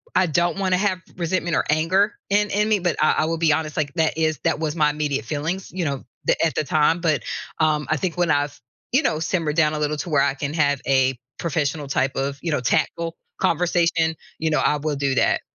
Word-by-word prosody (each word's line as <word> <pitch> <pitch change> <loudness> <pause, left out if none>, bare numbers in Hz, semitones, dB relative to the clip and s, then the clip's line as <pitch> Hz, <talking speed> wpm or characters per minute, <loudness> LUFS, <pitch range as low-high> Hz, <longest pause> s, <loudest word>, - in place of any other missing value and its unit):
I 185 0 +4
don't 170 +3 +1
wanna 185 -2 +2
have 190 -2 0 0.2
resentment 170 -1 -1
or - - +2
anger 185 +7 +2 0.2
in 205 +1 +2
in 210 +2 +1
me, 210 -2 +3
but 175 -2 0
I 155 - +5
I 155 - +2
will 165 +1 -1
be 160 -2 +3
honest, 155 0 -2
like, 145 -3 -1
that 160 -1 +1
is 155 -3 +1
that - - +1
was 155 0 -2
my 150 -2 +3
immediate 145 -6 -2
feelings, 160 +8 -3
you 180 -3 -2
know, 140 -2 -3 0.2
the - - +3
at 160 - -1
the - - +1
time, 155 +4 +2
but, 155 -7 +1 0.4
um, 155 -1 +2
I 155 - +2
think 180 +3 -2
when 175 -3 +2
I've, 145 0 0 0.4
you 280 - +4
know, 155 - +1
simmered 160 -2 -1
down 155 -2 +3
a 150 - -2
little 150 0 -1
to 175 - -5
where 145 -3 +3
I 140 0 +1
can 145 +1 -4
have 145 -4 +2
a 130 -1 +3 0.2
professional 150 -3 -1
type 135 -1 0
of, 140 +1 -2
you 165 - -2
know, 145 - 0
tactful 165 +6 0 0.3
conversation, 170 -1 +2 0.2
you 160 - 0
know, 155 - +2
I 150 - +2
will 150 0 -2
do 140 -1 0
that. - - +2
155 Hz, 235 wpm, -22 LUFS, 145-170 Hz, 0.4 s, I